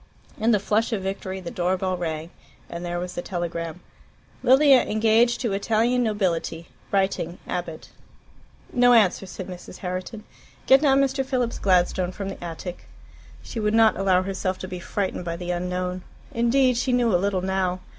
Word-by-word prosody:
In 220 +2 +2
the 220 - +5
flush 215 +4 0
of 200 -4 -2
victory 190 0 -4
the 170 - -6
door 180 +1 0
bell 185 0 -1
rang, 165 -1 -4 0.4
and 170 +1 -6
there 175 0 -3
was 180 0 -5
the 175 - -4
telegram: 170 -1 -4 0.6
"Lilia 265 +1 +6
engaged 225 +2 +2
to 230 -6 -1
Italian 230 +5 +1
nobility. 180 -7 -1 0.2
Writing. 190 -3 0
Abbott." 175 -3 -5 0.8
"No 245 0 +5
answer," 200 -4 +3
said 185 0 -7
Mrs. 180 0 -9
Herriton. 185 +4 -5 0.4
"Get 265 +1 +6
down 275 -2 +4
Mr. 270 0 +1
Philip's 255 -3 -1
Gladstone 180 -1 +2
from 195 +1 -5
the 195 - -8
attic." 175 +1 -7 0.6
She 230 - -6
would 210 0 +1
not 225 -1 +5
allow 185 -1 +2
herself 190 -1 -2
to 185 - -7
be 180 -1 -6
frightened 190 +1 -3
by 170 -1 -3
the 175 0 -4
unknown. 180 +1 -2 0.3
Indeed 250 0 +2
she 250 +1 0
knew 240 -3 +2
a 175 - +3
little 195 -2 0
now. 185 -1 -1
190 Hz, 170 wpm, -24 LUFS, 180-230 Hz, 0.8 s, Lilia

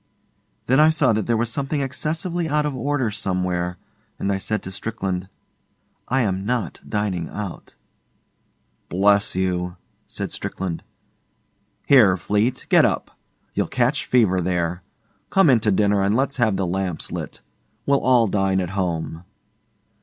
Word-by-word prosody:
Then 130 +3 +3
I 155 +1 +7
saw 145 -7 +3
that 110 0 -1
there 115 -1 +2
was 115 0 0
something 140 +3 -2
excessively 160 +5 -2
out 150 +1 +1
of 145 -2 -2
order 130 -2 -1
somewhere, 90 -3 -2 0.4
and 100 - -1
I 95 - 0
said 110 +2 -2
to 95 - -7
Strickland, 95 -3 -4 0.8
'I 130 +1 +2
am 95 -4 -1
not 120 +1 -2
dining 100 -6 -2
out.' 100 -5 -7 1.1
'Bless 100 +2 +3
you!' 90 -1 -1 0.3
said - - -4
Strickland. 90 -4 -4 1.0
'Here, 110 -10 +6
Fleete, 105 +7 0
get - - +6
up. - - 0 0.4
You'll - - 0
catch 125 +3 0
fever 105 -7 +3
there. 85 0 -1 0.5
Come 190 -7 +5
in 120 - +5
to 105 -1 +1
dinner 100 0 +2
and 100 +2 +2
let's 135 +2 0
have 110 -5 +2
the 95 - 0
lamps 90 -1 -2
lit. - - -6 0.4
We 140 - +2
'll 140 - +4
all 125 -3 +4
dine 95 -2 +1
at 90 -1 -2
home. 85 -4 -3
105 Hz, 150 wpm, -22 LUFS, 95-130 Hz, 1.1 s, I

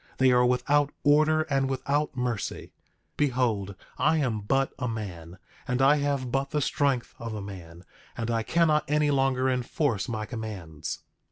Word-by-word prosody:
They 130 -1 +5
are 125 0 +5
without 140 +4 +2
order 155 +2 +4
and 135 -3 0
without 140 +2 -1
mercy. 120 -4 -3 0.5
Behold, 120 -8 0 0.2
I 160 - +3
am 125 -8 0
but 135 +6 0
a 125 - -1
man, 90 -7 -6 0.3
and 125 +1 0
I 140 +3 +5
have 140 -3 -1
but 135 +1 0
the 150 - 0
strength 140 -3 0
of 115 -2 -5
a - - -4
man, 90 -3 -10 0.3
and 115 0 -2
I 115 -1 +1
cannot 155 +4 +2
any 150 0 +2
longer 135 -1 +2
enforce 125 - 0
my 110 -2 -3
commands. 105 - -6
130 Hz, 160 wpm, -27 LUFS, 110-145 Hz, 0.5 s, They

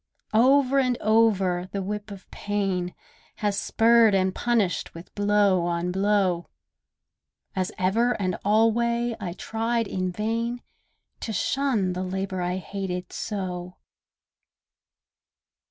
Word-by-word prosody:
Over 270 +4 +4
and 250 -2 +1
over 195 -5 +2
the 200 -1 -3
whip 210 +2 -4
of 200 -1 -10
pain 195 -3 -2 0.4
Has 205 -1 -1
spurred 225 -2 +4
and 190 -1 +1
punished 220 -9 0
with 165 +2 -11
blow 205 -3 +3
on 170 +1 -1
blow; 190 -2 +1 1.1
As 185 -1 -1
ever 225 +7 +2
and 185 -3 -1
alway 235 +3 +2
I 180 -4 -4
tried 230 +4 -1
in 185 -1 -2
vain 230 +5 -2 0.6
To 225 - -4
shun 220 -3 0
the 180 - -3
labour 185 0 -3
I 180 +1 -1
hated 185 -1 -5
so. 180 -3 -4
200 Hz, 115 wpm, -25 LUFS, 185-225 Hz, 1.1 s, Over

